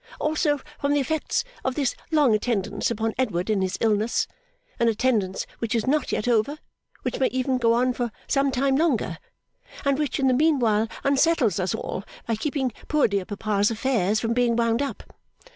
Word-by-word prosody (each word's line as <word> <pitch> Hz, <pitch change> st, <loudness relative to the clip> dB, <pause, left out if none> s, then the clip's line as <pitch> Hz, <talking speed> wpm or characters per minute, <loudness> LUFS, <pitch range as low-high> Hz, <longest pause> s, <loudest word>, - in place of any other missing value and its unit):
Also, 300 Hz, -1 st, +1 dB, 0.2 s
from 285 Hz, +1 st, +1 dB
the -, -, +3 dB
effects 310 Hz, -, -1 dB, 0.2 s
of 260 Hz, -1 st, -1 dB
this 275 Hz, -4 st, 0 dB
long 295 Hz, -7 st, +4 dB
attendance 215 Hz, -2 st, 0 dB
upon 225 Hz, -1 st, -1 dB
Edward 210 Hz, -6 st, 0 dB
in 205 Hz, -3 st, +1 dB
his 185 Hz, -1 st, -1 dB
illness; 220 Hz, 0 st, +1 dB, 0.5 s
an 235 Hz, -, +3 dB
attendance 220 Hz, -4 st, +1 dB
which 230 Hz, +1 st, -1 dB
is 225 Hz, -, 0 dB
not 295 Hz, +2 st, +1 dB
yet 210 Hz, -, -1 dB
over, 240 Hz, +5 st, +2 dB, 0.5 s
which -, -, -2 dB
may 265 Hz, -, +3 dB
even 255 Hz, 0 st, 0 dB
go 230 Hz, -1 st, +3 dB
on 250 Hz, +2 st, +2 dB
for 240 Hz, -2 st, -2 dB
some 275 Hz, 0 st, +2 dB
time 265 Hz, +1 st, +1 dB
longer, 250 Hz, -, 0 dB, 0.7 s
and 280 Hz, 0 st, +2 dB
which 295 Hz, -3 st, -1 dB
in 270 Hz, -, +2 dB
the 255 Hz, -, +4 dB
meanwhile 245 Hz, -7 st, +3 dB, 0.2 s
unsettles 275 Hz, -, +3 dB
us 185 Hz, 0 st, 0 dB
all -, -, -4 dB, 0.2 s
by 230 Hz, -, 0 dB
keeping 265 Hz, +2 st, -1 dB, 0.2 s
poor 300 Hz, -2 st, +3 dB
dear 200 Hz, -3 st, -1 dB
papa's 205 Hz, 0 st, 0 dB
affairs 220 Hz, -3 st, +1 dB
from 230 Hz, +1 st, 0 dB
being 240 Hz, -1 st, +2 dB
wound 230 Hz, +1 st, +1 dB
up. 280 Hz, -, -4 dB
240 Hz, 180 wpm, -25 LUFS, 215-275 Hz, 0.7 s, long